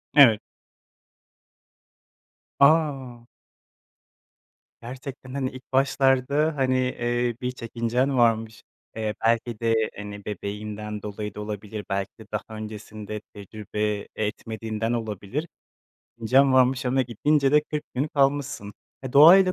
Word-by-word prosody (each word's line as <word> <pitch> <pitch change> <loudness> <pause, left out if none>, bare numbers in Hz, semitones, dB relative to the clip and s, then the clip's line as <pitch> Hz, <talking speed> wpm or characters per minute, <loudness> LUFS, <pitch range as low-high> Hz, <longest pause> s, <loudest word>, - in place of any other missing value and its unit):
Evet. 120 -7 +8 2.2
A! 140 -6 +2 1.5
Gerçekten, 130 +1 -8
hani, 135 -2 -1
ilk 130 +1 -13
başlarda, 135 +3 +2
hani, 130 -1 +1
eee, 120 -1 0
bir 125 0 -1
çekincen 125 +2 -1
varmış, 115 -2 +2 0.3
eee, 110 -1 -2
belki 115 -1 +1
de, 115 -1 +2 0.2
hani, 105 0 -8
bebeğinden 105 0 -5
dolayı 105 -1 -5
da 105 - -5
olabilir, 105 0 -6
belki 100 0 -2
de 110 - -11
daha 105 0 -1 0.2
öncesinde 105 -1 -7
tecrübe 105 0 -4
etmediğinden 110 +1 -3
olabilir, 115 - -3 0.7
çekincen 130 +4 +4
varmış 130 0 +3
ama 130 +1 +2
gidince 135 +4 +1
de 150 - +6
40 150 0 -4
gün 140 +4 0
kalmışsın. 140 -7 0 0.3
Eee, 130 - -5
doğayla 185 +6 +8
120 Hz, 110 wpm, -25 LUFS, 105-135 Hz, 2.2 s, Evet